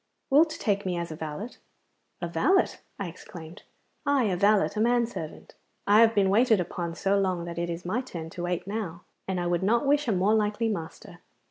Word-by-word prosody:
Wilt 310 Hz, +4 st, +6 dB
take 205 Hz, -11 st, -1 dB
me 180 Hz, -2 st, -2 dB
as 170 Hz, -1 st, -4 dB
a -, -, -5 dB
valet?' 160 Hz, +9 st, -6 dB, 0.7 s
'A -, -, 0 dB
valet!' 380 Hz, 0 st, +2 dB, 0.2 s
I 200 Hz, -, -4 dB
exclaimed. 170 Hz, 0 st, -11 dB, 0.4 s
'Aye, 285 Hz, -2 st, +2 dB
a -, -, +1 dB
valet, 205 Hz, +2 st, +3 dB
a -, -, -2 dB
man 240 Hz, +1 st, +3 dB
servant. 160 Hz, -9 st, -8 dB, 0.3 s
I 210 Hz, +2 st, +6 dB
have 230 Hz, 0 st, +5 dB
been 195 Hz, -2 st, +3 dB
waited 225 Hz, 0 st, +4 dB
upon 170 Hz, -1 st, -3 dB
so 195 Hz, +3 st, +1 dB
long 185 Hz, -3 st, -1 dB
that 170 Hz, -1 st, -5 dB
it 170 Hz, 0 st, -2 dB
is 170 Hz, +1 st, -5 dB
my 215 Hz, +8 st, 0 dB
turn 165 Hz, -10 st, -8 dB
to 175 Hz, -, -7 dB
wait 175 Hz, 0 st, -2 dB
now, 195 Hz, -5 st, -5 dB, 0.2 s
and 190 Hz, -1 st, -1 dB
I 175 Hz, -, -2 dB
would 175 Hz, 0 st, 0 dB
not 230 Hz, +7 st, +2 dB
wish 290 Hz, 0 st, +2 dB
a -, -, +2 dB
more 195 Hz, +2 st, +2 dB
likely 215 Hz, +1 st, +1 dB
master. 175 Hz, 0 st, -6 dB
195 Hz, 210 wpm, -27 LUFS, 175-225 Hz, 0.7 s, Wilt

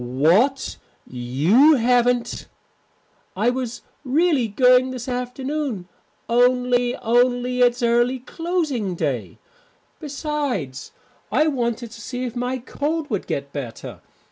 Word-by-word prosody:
"What! 170 Hz, -, +2 dB, 0.3 s
You 150 Hz, -, +3 dB
haven't 245 Hz, 0 st, +1 dB, 0.4 s
" -, -, -40 dB
"I 245 Hz, -, +4 dB
was 250 Hz, -2 st, -4 dB, 0.2 s
really 290 Hz, -2 st, +2 dB
going 250 Hz, +4 st, +4 dB
this 255 Hz, -1 st, -6 dB
afternoon, 250 Hz, -3 st, -3 dB, 0.4 s
only 245 Hz, 0 st, +2 dB
only 245 Hz, +1 st, +1 dB
it's 245 Hz, 0 st, +3 dB
early 240 Hz, +2 st, +2 dB
closing 285 Hz, -, -2 dB
day. -, -, -3 dB, 0.6 s
Besides, 280 Hz, -, -4 dB, 0.4 s
I 305 Hz, -, +3 dB
wanted 240 Hz, -5 st, -2 dB
to 230 Hz, -, -11 dB
see 250 Hz, +1 st, -5 dB
if 245 Hz, -1 st, -4 dB
my 250 Hz, +1 st, -2 dB
cold 295 Hz, +4 st, -3 dB
would 205 Hz, -, -2 dB
get 140 Hz, 0 st, -4 dB
better. 130 Hz, -6 st, -7 dB
245 Hz, 115 wpm, -22 LUFS, 230-265 Hz, 0.6 s, I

